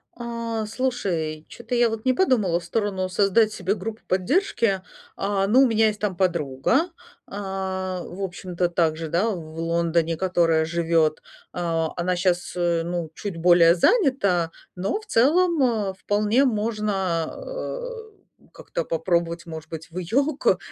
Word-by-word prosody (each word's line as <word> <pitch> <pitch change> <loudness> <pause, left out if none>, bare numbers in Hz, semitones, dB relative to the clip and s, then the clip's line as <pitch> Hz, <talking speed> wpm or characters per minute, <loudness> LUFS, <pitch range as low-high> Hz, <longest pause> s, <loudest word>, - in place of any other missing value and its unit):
А, 230 -2 -4
слушай, 195 -10 -2
чё-то 240 +1 -5
я 240 -1 +4
вот 225 +2 -5
не 255 - +4
подумала 225 - +2
в - - -13
сторону 190 0 -1
создать 205 +3 +3
себе 190 +2 -1
группу 225 0 -6
поддержки. 200 - +1 0.4
Э, 195 0 0
ну, 250 +6 +5
у 265 - +5
меня 225 -1 +3
есть 215 -1 -2
там 205 -3 -1
подруга, 170 - +1 0.4
э, - - -22
в 190 -2 -4
общем-то 180 -1 -2
также, 165 -2 0
да, 180 +8 +1
в 160 -5 -6
Лондоне, 165 0 0
которая 170 -3 +2
живет. 165 -1 +1 0.3
Э, 165 -2 -1
она 180 +1 0
щас, 175 -1 0
э, 170 -1 +1
ну, 170 -2 -3
чуть 195 0 -6
более 170 0 +6
занята, 200 - +2 0.2
но 190 - -1
в 435 - -15
целом, 330 - +3
э, 215 -6 +1
вполне 210 +6 +1
можно 210 -7 0
о - - -6 0.4
как-то - - -5
попробовать, 170 0 -1
может 160 -1 -8
быть, 165 0 -7
в 180 - -9
её 265 - 0
ко - - +3
190 Hz, 150 wpm, -24 LUFS, 170-225 Hz, 0.4 s, более